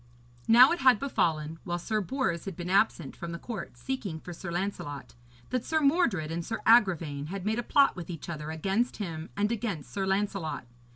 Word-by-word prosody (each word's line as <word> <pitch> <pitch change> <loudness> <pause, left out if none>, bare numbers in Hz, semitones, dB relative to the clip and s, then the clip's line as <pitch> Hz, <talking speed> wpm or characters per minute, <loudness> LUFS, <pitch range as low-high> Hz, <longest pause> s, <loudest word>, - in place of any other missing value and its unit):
Now 245 +4 +8
it 345 - 0
had 255 -4 +6
befallen, 160 - -1
while 175 -2 -2
Sir 215 +5 -1
Bors 190 - -2
had 195 -3 -5
been 175 +1 -5
absent 195 -7 +2
from 170 0 -6
the - - -4
court 195 -1 -7
seeking 240 -12 -4
for 175 - -8
Sir 170 - -7
Lancelot, 175 -6 -4 0.4
that 255 -2 0
Sir 315 - +1
Mordred 275 - +2
and 170 +1 -2
Sir 225 +6 -3
Agravaine 170 -11 +3
had 195 +2 -5
made 220 +2 0
a - - -2
plot 280 +4 +4
with 175 -2 -7
each 165 -4 -6
other 155 -3 -5
against 195 +10 -1
him 165 -5 -5
and 210 +2 +1
against 205 - -3
Sir 195 -1 -1
Lancelot. 195 -7 -1
190 Hz, 195 wpm, -29 LUFS, 165-230 Hz, 0.4 s, Now